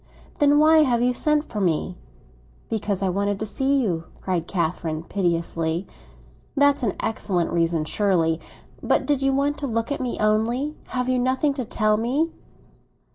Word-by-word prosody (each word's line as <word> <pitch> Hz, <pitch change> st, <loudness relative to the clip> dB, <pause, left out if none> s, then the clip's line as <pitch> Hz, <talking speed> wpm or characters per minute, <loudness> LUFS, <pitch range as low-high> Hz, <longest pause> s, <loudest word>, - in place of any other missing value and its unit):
"Then 290 Hz, 0 st, +5 dB
why 315 Hz, +1 st, +6 dB
have 245 Hz, -6 st, +3 dB
you 250 Hz, 0 st, +2 dB
sent 300 Hz, +3 st, +2 dB
for 210 Hz, -, -4 dB
me?" 180 Hz, 0 st, 0 dB, 0.8 s
"Because 205 Hz, -3 st, -1 dB
I 190 Hz, -, +1 dB
wanted 200 Hz, +2 st, 0 dB
to 215 Hz, -, -2 dB
see 270 Hz, +6 st, 0 dB
you!" 175 Hz, -9 st, -1 dB
cried 180 Hz, -3 st, -2 dB
Catherine 165 Hz, -3 st, -2 dB
piteously. 170 Hz, -1 st, -1 dB, 0.7 s
"That's 285 Hz, 0 st, +4 dB
an 225 Hz, -6 st, 0 dB
excellent 185 Hz, -6 st, -1 dB
reason, 165 Hz, -2 st, +1 dB
surely. 165 Hz, -4 st, +1 dB, 0.4 s
But -, -, +1 dB
did 290 Hz, -2 st, +1 dB
you 270 Hz, 0 st, +2 dB
want 280 Hz, +2 st, 0 dB
to 280 Hz, -, -3 dB
look 230 Hz, +1 st, -2 dB
at 285 Hz, -, -2 dB
me 250 Hz, -2 st, -2 dB
only? 230 Hz, +8 st, +1 dB
Have 250 Hz, -1 st, -2 dB
you 255 Hz, -1 st, +1 dB
nothing 260 Hz, +3 st, +1 dB
to 260 Hz, -3 st, -4 dB
tell 215 Hz, -1 st, +1 dB
me?" 270 Hz, +9 st, 0 dB
220 Hz, 165 wpm, -23 LUFS, 180-270 Hz, 0.8 s, why